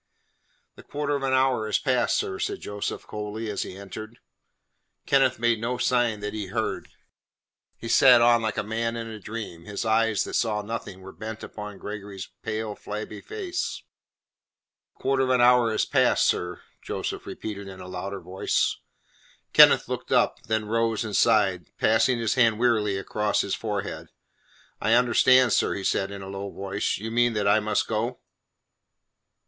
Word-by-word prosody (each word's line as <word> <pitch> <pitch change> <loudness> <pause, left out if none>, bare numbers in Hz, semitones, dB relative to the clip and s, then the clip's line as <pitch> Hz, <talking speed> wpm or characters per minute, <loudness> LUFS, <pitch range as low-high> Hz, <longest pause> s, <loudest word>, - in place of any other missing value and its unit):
"The - - -11
quarter 145 0 -2
of 140 - -3
an 135 -1 0
hour 130 -4 +2
is 105 - +2
passed, 125 -4 +1
sir," 95 - -3
said - - -2
Joseph 105 0 -5
coldly, 105 +1 -5
as 100 - -3
he 95 - -6
entered. 110 +3 -9 0.9
Kenneth 135 -2 +3
made 115 -1 +1
no 125 +2 -1
sign 120 -4 +1
that 105 0 -4
he 105 -2 -4
heard. - - -3 0.9
He 115 - -8
sat 125 0 +7
on 120 0 +5
like 110 -2 -2
a - - 0
man 115 +2 -2
in 115 - -4
a 110 -1 -8
dream. 105 -6 -7
His 105 +2 -4
eyes 110 -1 +2
that - - -7
saw 105 -3 0
nothing 100 -3 -6
were 95 0 -10
bent 110 +5 -7
upon 105 -1 -8
Gregory's 100 -2 -7
pale, 110 -1 -3
flabby 105 +1 -7
face. 385 -4 -4 1.1
"The - - -22
quarter 135 0 +2
of 130 - +1
an 130 -1 +3
hour 120 -1 +5
is 110 - +1
passed, - - +3
sir," 90 0 -1 0.2
Joseph - - -5
repeated 100 -2 -6
in 95 -1 -10
a 90 - -9
louder 95 +2 -5
voice. 95 +1 0 0.8
Kenneth - - +7
looked - - -5
up, - - +2
then 110 -1 0
rose 115 0 0
and 105 -2 -4
sighed, 100 -7 +3
passing 115 +3 +3
his 115 -2 0
hand 115 -4 +3
wearily 110 -4 +2
across 105 +2 0
his 100 - -3
forehead. 105 -3 -4 0.7
"I 110 +2 +2
understand, 125 0 +5
sir," - - +2
he 100 - -4
replied 95 0 0
in 100 -1 -7
a - - -8
low 100 0 -5
voice. 100 +1 -2
"You 110 +3 -6
mean 120 0 +2
that 105 -2 0
I 105 +2 +5
must 105 0 0
go?" 115 +3 -2
110 Hz, 175 wpm, -25 LUFS, 100-120 Hz, 1.1 s, sat